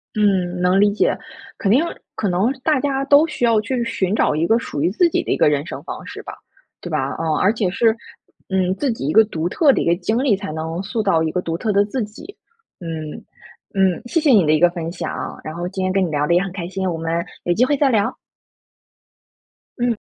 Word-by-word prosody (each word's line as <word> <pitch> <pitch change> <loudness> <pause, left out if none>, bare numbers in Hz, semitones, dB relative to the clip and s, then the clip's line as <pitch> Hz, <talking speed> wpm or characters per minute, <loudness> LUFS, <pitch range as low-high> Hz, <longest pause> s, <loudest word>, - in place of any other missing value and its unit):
嗯， 185 -4 +1
能 180 +2 +3
理 205 0 +4
解， 205 - +1 0.4
肯 195 - 0
定 265 +8 +4 0.3
可 205 - -1
能 190 +7 +1
大 305 -2 +2
家 270 0 -1
都 285 +3 +6
需 305 -6 -1
要 230 -2 +4
去 245 +3 -2
寻 200 -4 -1
找 150 - +2
一 160 +2 +1
个 225 +6 +3
属 145 - -5
于 165 - +2
自 340 - +3
己 - - 0
的 - - -3
一 - - +1
个 - - +4
人 145 0 0
生 - - -7
方 - - -7
式 - - -8
吧， - - -9 0.5
对 175 - -7
吧？ 155 -2 0 0.2
啊， 160 -1 -1
而 195 - +4
且 215 -4 -1
是， 225 +3 +2 0.5
嗯， 185 -1 +1
自 275 +4 -1
己 140 - -5
一 - - +1
个 220 +6 +7
独 170 -4 -3
特 285 - +4
的 - - 0
一 - - -1
个 170 - +3
经 220 +8 -1
历， 250 -7 +3
才 200 -4 -6
能 160 +2 -4
塑 220 +3 -2
造 195 -6 +2
一 160 - -1
个 180 - -1
独 165 -2 -3
特 215 +4 -1
的 200 0 +4
自 235 +4 -2
己。 215 - -11 0.4
嗯， 160 -3 -5 0.6
嗯， 190 -2 +2
谢 285 +8 0
谢 310 -2 +2
你 205 -8 +5
的 150 - +3
一 155 - +3
个 175 - +5
分 170 -2 -5
享， 175 - -5
然 155 - -6
后 175 +1 -3
今 190 0 -4
天 185 - 0
跟 190 0 +2
你 - - -3
聊 150 0 0
得 170 - +3
也 180 - +3
很 195 - -5
开 175 -2 -5
心， 190 0 -3
我 170 -3 -2
们 165 +1 -2 0.2
有 175 - +1
机 235 +7 +3
会 290 - +1
再 280 0 +2
聊。 225 0 +1 1.6
嗯。 240 -2 +1
195 Hz, 265 characters per minute, -20 LUFS, 170-230 Hz, 1.6 s, 个